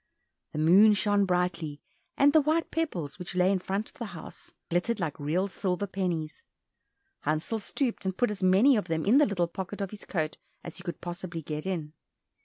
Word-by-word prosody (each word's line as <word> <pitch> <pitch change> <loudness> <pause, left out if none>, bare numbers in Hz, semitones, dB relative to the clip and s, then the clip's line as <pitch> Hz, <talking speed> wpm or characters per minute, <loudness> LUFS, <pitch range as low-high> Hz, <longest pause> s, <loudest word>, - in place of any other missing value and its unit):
The - - -5
moon 190 +7 +6
shone 205 0 +2
brightly, 175 -5 -1 0.4
and 285 +1 +5
the 315 - +7
white 310 +3 0
pebbles 180 - -2
which 180 +1 -6
lay 180 +1 +4
in 195 - +1
front 195 +4 -2
of 295 - -21
the 235 - -3
house - - -11 0.2
glittered 185 +7 +1
like 160 -5 -3
real 165 +7 0
silver 190 0 -2
pennies. 180 -5 -3 0.8
Hansel 155 +9 -1
stooped 240 +4 -2
and 190 -1 -2
put 245 - +2
as 205 -1 -6
many 195 +9 +5
of 210 - 0
them 160 -2 -1
in 235 +8 +6
the 295 - +5
little 185 -4 +1
pocket 190 +3 -6
of 195 -2 -3
his 210 - -9
coat 155 -4 -2 0.3
as 170 - -7
he 185 - -8
could 175 -4 -6
possibly 175 -1 -5
get 150 +3 -4
in. 160 -5 -3
185 Hz, 200 wpm, -28 LUFS, 170-205 Hz, 0.8 s, the